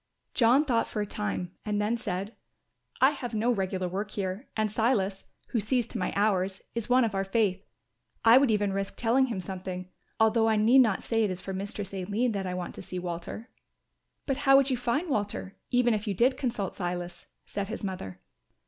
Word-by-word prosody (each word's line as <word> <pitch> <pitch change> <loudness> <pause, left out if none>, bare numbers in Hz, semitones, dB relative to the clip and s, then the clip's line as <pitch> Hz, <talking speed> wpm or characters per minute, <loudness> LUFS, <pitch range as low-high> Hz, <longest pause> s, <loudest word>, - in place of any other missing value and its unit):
John 255 +5 +4
thought 235 -5 +1
for 215 - -4
a 210 - 0
time 205 -4 -3
and 210 -1 -1
then 210 +3 +1
said, 205 -2 -4 0.7
"I 265 +2 +7
have 245 -5 -5
no 225 +3 +2
regular 190 -4 -1
work 200 +4 -3
here 200 +3 -4
and 215 -1 +1
Silas, 205 -4 +1 0.2
who 235 - 0
sees 235 +3 +1
to - - -4
my - - -1
hours, 195 -2 +1
is 230 0 -4
one 250 0 +5
of 220 - -2
our 195 0 0
faith. 195 -1 +1 0.6
I 230 +3 +9
would 275 -2 +3
even 205 -2 +1
risk 195 0 -3
telling 250 +3 +3
him 225 -6 -3
something; 185 0 -6 0.3
although 225 0 +4
I 220 - +3
need 225 +5 +5
not 220 -6 +2
say 225 -1 +1
it 210 - +1
is 185 -1 -3
for 195 - -6
Mistress 200 +1 -5
Aline 205 +6 0
that 195 -3 -2
I 180 - -3
want 180 -1 -4
to - - -9
see 185 -1 -6
Walter." 180 +6 -5 0.8
"But 270 -2 0
how 270 -1 +6
would 275 0 +3
you - - +3
find 250 +8 0
Walter 205 - -2
even 245 -2 +3
if 215 +1 -2
you 200 - -1
did 250 +7 +3
consult 230 -8 -2
Silas?" 175 -1 -5 0.2
said 200 -1 -4
his 225 +1 -6
mother. 140 - -5
210 Hz, 205 wpm, -28 LUFS, 190-235 Hz, 0.8 s, I